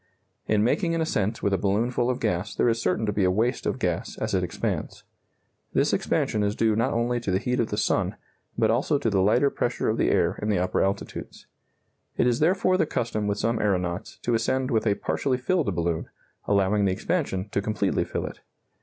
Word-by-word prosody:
In 105 -1 +3
making 165 - +1
an 165 - 0
ascent 110 -9 -1
with 100 - +1
a 95 - +1
balloon 105 +5 +1
full 120 0 0
of 125 - -1
gas 105 -2 -1
there - - +2
is 115 0 +1
certain 105 +2 0
to 105 - -1
be 100 - +1
a 90 - +4
waste 110 +7 0
of - - -1
gas - - -2
as - - -3
it - - +2
expands. - - -3 0.7
This - - +2
expansion 105 - 0
is 105 0 0
due 110 -2 +2
not 115 +4 +1
only 120 +1 +1
to 115 - -4
the 95 - +2
heat 125 +5 -1
of 115 - +1
the - - -4
sun, - - +1 0.4
but - - +3
also 150 - +1
to 120 -6 -1
the 95 -1 +2
lighter 120 +8 +3
pressure - - -1
of - - -1
the - - +3
air - - +1
in 105 - -1
the 105 - +2
upper 90 +1 0
altitudes. 100 +1 -4 0.7
It - - +3
is 120 -1 +2
therefore 185 +3 +3
the 160 - +1
custom 110 -5 -2
with 100 0 0
some 115 +2 0
aeronauts 90 -2 -1
to 120 - 0
ascend 130 +4 0
with 110 -1 +1
a 100 - +3
partially 130 +4 -1
filled 135 - 0
balloon, 85 -1 -1 0.4
allowing 100 0 +2
the 95 - +2
expansion 100 - -2
to 100 - -1
completely 100 -2 0
fill - - -4
it. - - -8
110 Hz, 220 wpm, -26 LUFS, 100-125 Hz, 0.7 s, a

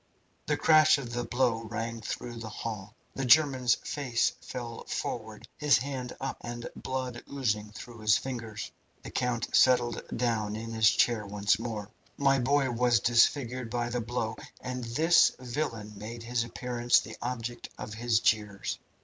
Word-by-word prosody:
The - - +1
crash 155 -1 +6
of 125 -4 -6
the 120 0 -1
blow 120 0 +1
rang 115 +1 -4
through 120 +2 -5
the 115 -1 -6
hall. 105 -1 -6 0.2
The 135 - -3
German's 130 -2 +5
face 130 -5 0
fell 120 -2 -6
forward, 110 0 -4
his 150 -2 +5
hand 125 0 -5
up, - - -3
and 120 0 -6
blood 130 -2 -4
oozing 105 -7 -1
through 115 +2 -10
his 105 -1 +4
fingers. 115 -5 -5 0.3
The - - -8
count 120 -2 -1
settled 125 -2 +4 0.2
down 110 -4 0
in 115 +1 -6
his 110 -1 +5
chair 115 -1 +2
once 100 0 +1
more. 110 -3 -5 0.3
"My 135 -1 +3
boy 135 +1 +2
was 120 -1 +3
disfigured 120 +2 +2
by 120 0 -1
the 120 0 -1
blow, 115 -1 -3 0.2
and 125 -1 -5
this 160 +9 +4
villain 120 -5 -4
made 115 +3 -7
his 120 0 0
appearance 120 0 +1
the - - -8
object 120 -1 -4
of 105 - -6
his 115 0 +1
jeers. 105 -3 0
120 Hz, 160 wpm, -29 LUFS, 110-125 Hz, 0.3 s, crash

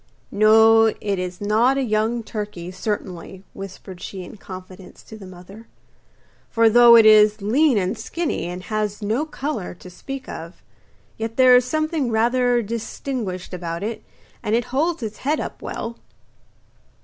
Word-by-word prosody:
'No, 220 +1 +6
it 200 -2 -2
is 180 0 -5
not 225 +6 +2
a 275 - 0
young 225 +1 0
turkey, 205 -5 -6
certainly,' 185 -2 -5
whispered 190 -1 -10
she 190 -1 -7
in 180 - -11
confidence 185 -1 -12
to 220 - -12
the 200 -3 -11
mother, 185 +5 -13 0.8
'for 230 -1 +3
though 240 0 +8
it 225 -1 +7
is 215 0 +6
lean 250 +6 +2
and 185 +2 0
skinny, 300 - -3
and 180 +1 -6
has 210 +1 -3
no 230 +9 -1
colour 275 - -5
to 180 +1 -13
speak 270 +8 -8
of, 170 - -9 0.5
yet 225 0 -5
there 255 -1 +7
is 250 0 +4
something 310 -1 -1
rather 240 +2 +2
distinguished 220 -3 -5
about 170 0 -5
it, 220 +1 -4 0.4
and 210 - 0
it 235 - 0
holds 315 +1 0
its 215 -1 -5
head 300 +4 -1
up - - -6
well. 230 0 -6
215 Hz, 155 wpm, -22 LUFS, 190-240 Hz, 0.8 s, though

